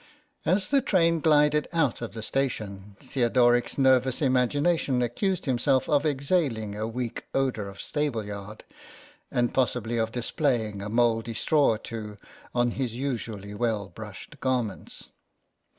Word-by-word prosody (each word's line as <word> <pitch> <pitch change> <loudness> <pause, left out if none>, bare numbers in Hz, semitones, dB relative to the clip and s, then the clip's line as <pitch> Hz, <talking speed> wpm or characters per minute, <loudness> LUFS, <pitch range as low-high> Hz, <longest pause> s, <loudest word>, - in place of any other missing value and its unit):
As 185 +3 +2
the 280 -1 +4
train 170 -8 +3
glided 150 -1 +4
out 160 -9 +1
of 120 - -5
the 110 -1 -6
station 105 -7 -3
Theodoric's 120 -1 +2
nervous 130 -1 +3
imagination 140 +1 +2
accused 180 - -1
himself 130 0 +2
of 150 +1 +2
exhaling 140 - 0
a 110 +1 -2
weak 120 0 -4
odour 130 -7 0
of 100 0 -10
stable 145 -7 -2
yard, 105 +1 -8 0.7
and 120 -1 0
possibly 120 -3 0
of 110 0 0
displaying 120 - -1
a 100 - -5
mouldy 115 0 +1
straw 150 +3 +3
or - - -3
two 105 -2 -7 0.4
on 120 0 +2
his 125 -2 -3
usually 115 -6 -4
well 105 -3 -1
brushed 105 - -10
garments. 125 -6 -2
120 Hz, 135 wpm, -27 LUFS, 110-140 Hz, 0.7 s, the